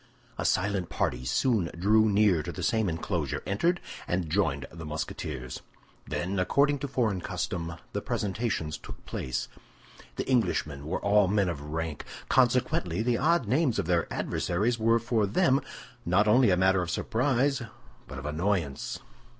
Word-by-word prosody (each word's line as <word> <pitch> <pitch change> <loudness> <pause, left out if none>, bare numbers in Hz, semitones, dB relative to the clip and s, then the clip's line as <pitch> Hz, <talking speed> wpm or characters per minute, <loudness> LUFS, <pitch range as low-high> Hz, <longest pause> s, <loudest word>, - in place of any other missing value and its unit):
A - - -1
silent 95 -2 +1
party 60 +1 -1
soon 100 - +1
drew 110 +4 +4
near 100 -5 +4
to 85 - -5
the - - -6
same 110 -5 +2
enclosure, 80 0 -2
entered, 170 - +1 0.3
and 90 -3 -1
joined 70 -8 +1
the 80 0 -9
Musketeers. 65 -4 -5 0.5
Then, 95 +2 -2
according 140 +10 +2
to 140 - -3
foreign 115 -8 0
custom, 85 -1 -3 0.2
the - - -2
presentations 100 -6 -2
took - - -11
place. 65 0 -3 0.7
The - - -3
Englishmen 75 - 0
were 90 - -2
all 100 -1 +5
men 100 -1 +2
of 80 -5 -4
rank; 80 +1 -4 0.3
consequently 120 -7 +2
the 120 -1 +1
odd 155 -4 +2
names 130 +1 +2
of - - 0
their 85 0 +1
adversaries 110 +7 0
were 115 +1 +4
for 115 -2 +1
them 135 - +3 0.4
not 95 +5 +3
only 120 +2 +5
a 90 - +3
matter 95 0 +3
of 90 - -3
surprise, 135 +7 +1 0.5
but - - -8
of 70 - -7
annoyance. 80 -1 -1
100 Hz, 155 wpm, -28 LUFS, 85-120 Hz, 0.7 s, all